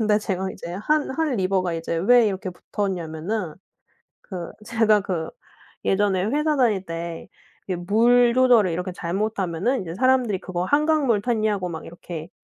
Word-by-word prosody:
근데 210 -1 +3
제가 190 -2 -2
이제 170 - -8
한 295 +11 +1 0.2
Han 315 -4 +1
river가 185 -3 0
이제 165 0 -3
왜 230 +6 +5
이렇게 195 -1 -3
붙었냐면은 180 -1 -4 0.7
그 180 -4 -7 0.2
제가 220 -2 +3
그 180 -5 -3 0.6
예전에 195 -1 +2
회사 300 +6 +1
다닐 215 -7 +2
때 165 0 -6 0.4
이렇게 180 -2 -3
물 240 +3 +4
조절을 245 -7 +5
이렇게 180 +2 -3
잘못하면 195 +4 -1
사람들이 255 -5 +2
"그거 180 -1 -3
한강물 285 -4 +2
탔냐?"고 215 -6 0
막 160 -2 -6
이렇게 170 -1 -8
200 Hz, 335 characters per minute, -23 LUFS, 180-235 Hz, 0.7 s, 왜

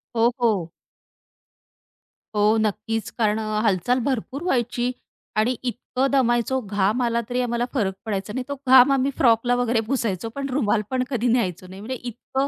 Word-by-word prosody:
हो, 230 +1 +4
हो. 200 -8 +1 1.7
हो, 210 +2 +4
नक्कीच. 220 +1 -2
कारण 215 -2 +1
हालचाल 215 +1 +1
भरपूर 265 +2 -2
व्हायची 245 -6 0 0.5
आणि 230 +4 +2
इतकं 255 +2 -1
दमायचो 255 -1 +2
घाम 205 +2 0
आला 235 -1 +1
तरी 250 0 0
आम्हाला 240 -1 -1
फरक 205 -8 0
पडायचा 210 -1 -3
नाही. 260 +2 -2
तो 285 - -2
घाम 260 +1 +8
आम्ही 270 0 +2
फ्रॉकला 240 0 +3
वगैरे 245 -1 +1
पुसायचो 225 -5 -1
पण 275 0 -3
रुमाल 235 -5 +1
पण 255 -1 0
कधी 245 -3 0
न्यायचो 190 -7 0
नाही 190 +2 -10
म्हणजे 255 +4 -4
इतकं 265 +3 -2
235 Hz, 155 wpm, -23 LUFS, 215-255 Hz, 1.7 s, घाम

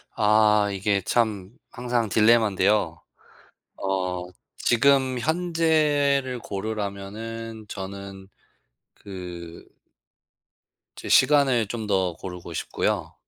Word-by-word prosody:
아 105 -1 +4
이게 100 +1 0
참 105 -2 -1 0.2
항상 120 -3 -1
딜레마인데요. 105 -5 +3 0.8
어 90 -2 -2 0.3
지금 130 +1 +3
현재를 150 -4 +1
고르라면은 110 +2 -5
저는 95 0 -8 0.7
그 90 -4 -9 1.3
제 - - -8
시간을 135 -7 +4
좀 110 0 -5
더 95 -3 +1
고르고 90 -1 -9
싶고요. - - -2
105 Hz, 170 characters per minute, -24 LUFS, 95-120 Hz, 1.3 s, 아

